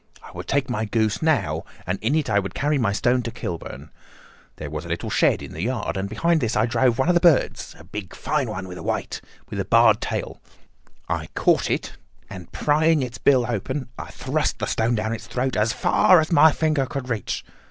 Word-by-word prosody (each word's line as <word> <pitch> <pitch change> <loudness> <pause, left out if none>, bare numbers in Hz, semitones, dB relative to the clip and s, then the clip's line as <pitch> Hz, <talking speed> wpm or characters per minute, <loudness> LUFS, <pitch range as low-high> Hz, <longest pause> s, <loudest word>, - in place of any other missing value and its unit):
I - - -12
would - - -8
take 140 -1 +1
my 110 -3 -2
goose 110 -1 0
now, 100 - +1 0.2
and 90 +2 -2
in 120 +8 +1
it 155 -2 0
I 100 -3 +3
would 95 -1 -5
carry 145 0 +1
my 110 -5 +1
stone 120 +5 +1
to 115 - -4
Kilburn. 85 -8 -7 0.6
There 75 -2 -7
was 75 0 -4
a - - -9
little 85 - -3
shed - - +2
in - - -9
the 80 - -6
yard, 115 -1 -2
and 95 +1 -3
behind 165 +9 +1
this 115 0 -1
I - - +3
drove 120 0 +2
one 135 - +1
of 180 - +4
the 175 - +3
birds—a 165 -5 +2 0.4
fine 150 -3 -1
big - - -6
one, 95 -3 -6
white, - - -3 0.3
with 100 - -4
a 100 - -1
barred 110 +1 +5
tail. - - -4 0.7
I - - -2
caught - - +2
it, - - -3 0.3
and 90 -3 -9
prying 155 0 +2
its 125 -1 -6
bill 130 -4 +4
open, 125 +4 -3
I - - -7
thrust - - -2
the - - -2
stone 115 +2 0
down 110 +1 -1
its 115 - -7
throat 130 +1 -2
as 110 +1 +2
far 185 +8 +4
as 155 +1 -1
my 160 0 +7
finger 155 -4 0
could 135 -1 -5
reach. 115 -6 -3
120 Hz, 215 wpm, -23 LUFS, 105-140 Hz, 0.7 s, my